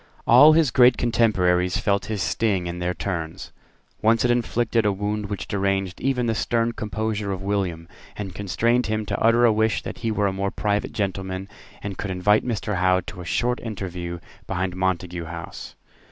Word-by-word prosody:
All 145 +7 +8
his 155 -5 +3
great 125 0 +6
contemporaries 90 -7 +2
felt 100 -1 0
his 105 -4 -2
sting 100 -5 0
in 85 0 -4
their 90 0 -1
turns. 85 -5 -4 0.5
Once 115 +2 +3
it 120 - +3
inflicted 120 -1 +1
a 105 - +2
wound 105 +1 -2
which 100 -1 -5
deranged 95 -2 -1
even 130 -2 0
the 115 - +1
stern 115 +1 0
composure 110 -2 -3
of 95 0 -4
William, 95 -5 -2 0.3
and 95 -3 -6
constrained 115 +6 0
him 110 0 -1
to - - -2
utter 115 +2 +4
a 115 - +5
wish 110 +1 +1
that - - -7
he 115 - -2
were 105 -1 0
a 100 0 -1
private 105 0 -1
gentleman, 95 -1 -3 0.4
and 100 -2 -5
could 100 - -3
invite 95 +3 +2
Mr. 105 -4 -2
Howe 95 0 +3
to 90 0 -9
a - - -8
short 120 +7 0
interview 90 -5 -5 0.3
behind 90 0 -2
Montague 90 -2 -2
House. 85 0 -8
100 Hz, 180 wpm, -23 LUFS, 95-115 Hz, 0.5 s, All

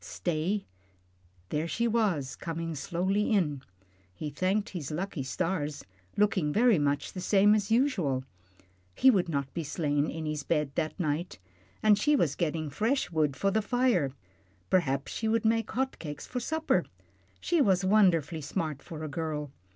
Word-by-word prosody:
Stay 175 +5 -2 0.8
there 155 +2 -1
she 235 +7 0
was, 200 - 0
coming 165 0 -4
slowly 185 - 0
in 150 -10 +1 0.5
he 150 - -5
thanked 190 +7 0
his 165 -8 -5
lucky 170 0 -3
stars, 145 +2 -2 0.3
looking 200 -7 +2
very 225 -1 +4
much 145 0 0
the 185 - -5
same 205 +2 +5
as 210 -1 +1
usual. 215 - +1 0.7
He 265 - +6
would 185 -6 +1
not 140 -3 -2
be 170 - -3
slain 145 -1 0
in 160 0 -5
his 155 -1 -2
bed 150 -2 0
that 155 +5 -2
night. 160 +1 -2 0.5
And 210 -1 +5
she 295 +6 +3
was 165 - +2
getting 155 -1 -2
fresh 225 - 0
wood 155 -4 +1
for 195 +5 +1
the 220 +2 +2
fire. 230 - +1 0.6
Perhaps 140 -7 +1
she 220 - -2
would 225 0 +1
make 225 0 +2
hot 265 +2 -2
cakes 150 -3 -6
for 250 - -4
supper. 315 +6 0 0.5
She 345 -3 +1
was 190 -6 +3
wonderfully 175 -6 +3
smart 150 0 -3
for 155 -2 -8
a - - -3
girl. 150 -2 -3
170 Hz, 160 wpm, -29 LUFS, 150-210 Hz, 0.8 s, He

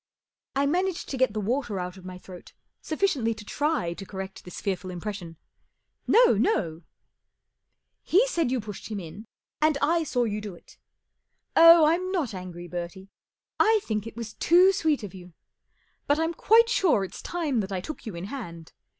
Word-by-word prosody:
I 275 +1 +2
managed 360 +4 -1
to 270 - -3
get 260 -4 +2
the 215 - -2
water 225 -1 -1
out 180 0 -5
of 185 -1 -14
my 185 0 -7
throat 180 -1 -13 0.3
sufficiently 300 - 0
to 210 -1 -11
try 290 - -1
to 195 - -9
correct 190 0 -8
this 180 - -9
fearful 185 -2 -3
impression. 180 -2 -6 0.7
M - - +1
No, 470 +1 +7
no! 170 - 0 0.4
" - - -57
" - - -53
He 400 +8 +6
said 340 - 0
you 255 0 0
pushed 210 -2 -8
him 210 -2 -4
in, 190 +5 -9 0.4
and 310 -1 +3
I 330 +4 +2
saw 250 -5 0
you 210 -2 -2
do 205 -4 -7
it. - - -19 0.8
Oh, 330 -1 +9
I'm 355 +4 +1
not 320 - -1
angry, 180 -2 -8
Bertie. 175 +2 -7 0.5
I 440 0 +5
think 215 -1 -3
it 225 - -10
was 230 -2 -6
too 365 +3 +5
sweet 315 - 0
of 200 - -7
you. 180 -2 -12 0.7
But 290 - +3
I'm 325 +1 0
quite 455 +7 +5
sure 370 - +2
it's 190 - -7
time 315 -8 -1
that 195 -2 -3
I 190 - -1
took 265 +6 -8
you 210 - -5
in 170 - -6
hand. 175 - -8
225 Hz, 190 wpm, -26 LUFS, -, 0.8 s, Oh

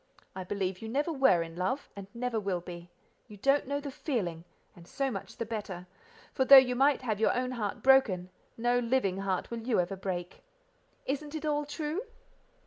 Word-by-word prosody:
I 190 - -4
believe 190 -1 -3
you 220 - -6
never 290 +7 0
were 265 - +4
in 165 0 -10
love, 190 +11 -2
and 200 -1 -8
never 240 -1 -1
will 195 -3 -1
be: 175 0 -9 0.4
you 210 -3 -12
don't 275 +6 +2
know 285 +1 -1
the 285 -1 -6
feeling, 200 - -3 0.3
and 170 -1 -15
so 270 +5 -2
much 195 - -7
the 230 - -3
better, 205 -5 -5 0.5
for 265 - +2
though 275 +1 +10
you 255 -1 +6
might 270 +1 +3
have 215 -4 -1
your 220 - +2
own 255 0 -1
heart 215 -5 -4
broken, 205 -10 +4 0.3
no 240 +1 +2
living 230 -6 +1
heart 195 +1 -2
will 235 - -3
you 230 -2 0
ever 180 +2 -1
break. 185 -2 -5 0.6
Isn't 290 +3 -3
it 310 0 -4
all 295 -1 0
true?" 305 +4 -3
230 Hz, 195 wpm, -30 LUFS, 185-270 Hz, 0.6 s, though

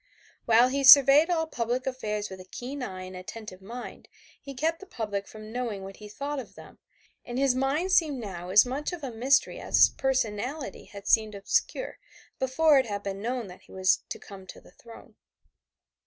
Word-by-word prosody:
While 235 +2 +5
he 275 +1 -1
surveyed 280 +4 +8
all 325 -2 +1
public 245 -3 -3
affairs 210 -6 -3
with 190 - -8
a - - -9
keen 265 +7 -7
eye 190 -6 -6
and 185 0 -9
attentive 185 +1 -9
mind, 235 +5 -9 0.3
he 275 -1 -9
kept 325 +5 -1
the 390 - -12
public 205 - -4
from 215 0 -11
knowing 230 -5 -4
what 195 0 -9
he 210 -1 -11
thought 280 +6 -4
of 255 - -10
them, - - -14 0.4
and 240 0 -6
his 270 -1 +3
mind 275 +8 0
seemed 315 -6 +3
now 180 -5 -7
as 205 +5 +6
much 270 +7 -3
of 340 -4 -7
a 265 - -4
mystery 255 +4 +1
as - - -3
his - - +8
personality 260 +1 -2
had 200 -1 -12
seemed 215 -2 +3
obscure 200 - -2 0.4
before 275 +3 +4
it 260 - -1
had 205 -1 -4
been 195 0 -5
known 245 +1 -3
that 180 -1 -12
he - - -20
was 190 0 +2
to - - -5
come 190 -2 -12
to - - -10
the - - -19
throne. 230 +5 -15
240 Hz, 200 wpm, -27 LUFS, 205-275 Hz, 0.4 s, surveyed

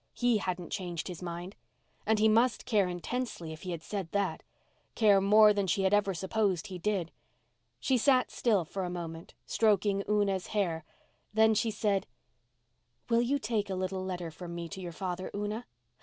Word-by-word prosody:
He 245 -2 +3
hadn't 180 -3 -4
changed 175 -4 -3
his 180 -2 -7
mind. 175 +2 -6 0.5
And 220 0 +4
he 215 +1 +4
must 230 +2 +3
care 210 -6 +3
intensely 180 -2 -4
if 155 - -11
he 185 - -6
had 170 -2 -4
said 195 -5 -4
that—care 200 +1 0
more 210 +2 +7
than 200 -1 0
she 195 +3 +1
had 190 +1 +2
ever 200 -2 +2
supposed 190 -1 0
he 185 -2 -7
did. 190 -3 -1 0.7
She 255 - +2
sat 255 +1 +3
still 210 -8 +2
for 190 +4 -4
a 180 - -2
moment, 165 -1 -7
stroking 205 -2 +2
Una's 200 -3 +1
hair. 165 -6 0 0.5
Then 220 0 +5
she 220 +2 +1
said, 205 -2 0 1.0
"Will 230 0 +5
you 260 +4 +1
take 215 -5 -1
a 190 - -1
little 185 0 -2
letter 180 -3 -4
from 170 +1 -8
me 170 -1 -4
to 190 +1 -7
your 175 -1 -5
father, 185 +1 -4
Una?" 210 +3 -3
195 Hz, 175 wpm, -30 LUFS, 180-215 Hz, 1.0 s, more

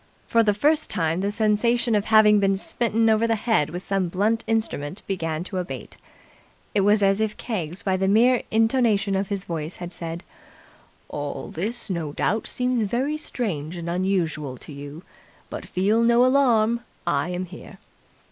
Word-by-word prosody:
For 230 - +3
the 210 -2 +2
first 300 +7 +3
time 165 +1 0
the 200 +1 0
sensation 230 +3 +1
of 205 -1 +1
having 215 -1 +6
been 195 -1 +2
smitten 225 +2 0
over 220 +1 +3
the 225 - +2
head 215 -9 +1
with 175 +3 -6
some 195 -2 0
blunt 210 +6 0
instrument 215 -7 -2
began 165 -4 -2
to 190 +1 -6
abate. 135 - -7 0.8
It 205 - +3
was 205 +1 +3
as 195 +2 +3
if 215 -1 -1
Keggs 180 -7 -4
by 190 -1 +1
the 190 +1 0
mere 240 +5 +4
intonation 225 -3 +2
of 195 0 0
his 200 -1 -3
voice 165 -2 -4
had 175 0 -5
said, 165 0 -6 0.8
"All 145 -1 -5
this 220 +9 -3
no 170 -7 -3
doubt 215 +7 -1
seems 250 -1 0
very 245 +8 -1
strange 180 - -4
and 170 0 -6
unusual 170 -7 -1
to 150 - -11
you, 145 +4 -9 0.5
but - - -6
feel 205 +5 +1
no 235 +1 +5
alarm! 235 -4 +3 0.3
I 140 +5 0
am 180 +1 -3
here!" 180 +2 -12
200 Hz, 170 wpm, -24 LUFS, 175-225 Hz, 0.8 s, having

